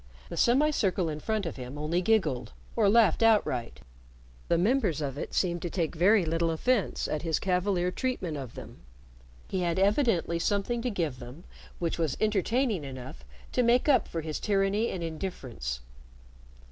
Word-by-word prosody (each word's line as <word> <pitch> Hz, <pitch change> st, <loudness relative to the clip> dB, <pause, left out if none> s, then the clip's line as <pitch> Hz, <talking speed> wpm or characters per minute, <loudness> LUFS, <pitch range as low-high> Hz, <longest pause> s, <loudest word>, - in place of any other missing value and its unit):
The -, -, -6 dB
semicircle 240 Hz, -, +2 dB
in 150 Hz, -1 st, -4 dB
front 215 Hz, +4 st, -2 dB
of 165 Hz, -, -5 dB
him 130 Hz, +2 st, -7 dB
only 155 Hz, +4 st, 0 dB
giggled 175 Hz, -, +1 dB, 0.2 s
or 215 Hz, -4 st, +4 dB
laughed 220 Hz, -3 st, +4 dB
outright. 205 Hz, -, +2 dB, 0.7 s
The 170 Hz, -, +2 dB
members 195 Hz, -, +2 dB
of 140 Hz, -3 st, -3 dB
it 145 Hz, -, -5 dB
seemed 175 Hz, -2 st, +1 dB
to 175 Hz, -, -3 dB
take 165 Hz, -2 st, -1 dB
very 185 Hz, +3 st, +4 dB
little 165 Hz, +1 st, 0 dB
offense 200 Hz, +5 st, 0 dB
at 150 Hz, -, -2 dB
his 165 Hz, -2 st, 0 dB
cavalier 180 Hz, -1 st, 0 dB
treatment 185 Hz, -, -2 dB
of 135 Hz, -5 st, -7 dB
them. -, -, -10 dB, 0.7 s
He 190 Hz, -, -2 dB
had 175 Hz, -1 st, 0 dB
evidently 195 Hz, -, +2 dB
something 205 Hz, +6 st, 0 dB
to 250 Hz, -, -1 dB
give 165 Hz, -, -2 dB
them 125 Hz, +7 st, -10 dB, 0.3 s
which 170 Hz, -1 st, -2 dB
was 160 Hz, -5 st, 0 dB
entertaining 215 Hz, -, +1 dB
enough 130 Hz, -, -8 dB, 0.3 s
to -, -, +2 dB
make 245 Hz, +3 st, +3 dB
up 260 Hz, -7 st, +4 dB
for 165 Hz, -, -4 dB
his 155 Hz, -1 st, -4 dB
tyranny 200 Hz, +2 st, +1 dB
and 175 Hz, -, -4 dB
indifference. 130 Hz, -, -5 dB
180 Hz, 165 wpm, -28 LUFS, 155-215 Hz, 0.7 s, or